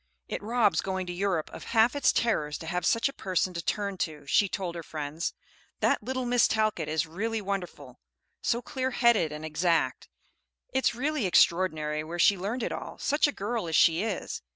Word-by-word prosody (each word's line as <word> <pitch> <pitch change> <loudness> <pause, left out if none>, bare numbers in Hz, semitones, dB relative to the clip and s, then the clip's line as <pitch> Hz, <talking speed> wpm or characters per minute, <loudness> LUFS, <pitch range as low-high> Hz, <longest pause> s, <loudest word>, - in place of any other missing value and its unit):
"It - - -4
robs 220 -1 +2
going 190 -1 -3
to 175 - -5
Europe 180 -3 -1
of - - -8
half 230 +4 +5
its 280 -2 +4
terrors 150 -11 0
to - - -9
have 180 +1 -1
such 230 - +3
a 275 - -6
person 185 -3 -1
to 170 - -3
turn 200 0 -2
to," 155 -3 -3
she 195 +8 +3
told 185 -3 -3
her 170 - -5
friends. 155 0 -4 0.5
"That - - +2
little 255 +3 -3
Miss 245 -1 +4
Talcott 215 -8 0
is 155 +1 0
really 220 +8 -3
wonderful, 180 - -5 0.4
so 235 +1 0
clear 260 -1 -2
headed 235 -10 +3
and 150 +1 -6
exact. 165 +2 0 0.6
It's 260 -2 +2
really 280 -3 0
extraordinary 155 -4 +2
where 165 +2 -6
she 200 +4 +5
learned 210 +7 -3
it - - -2
all, - - -6
such 290 +1 +2
a - - -1
girl 220 -4 -3
as 160 - -1
she 165 +2 +5
is. 215 -3 -3
190 Hz, 195 wpm, -28 LUFS, 165-230 Hz, 0.6 s, half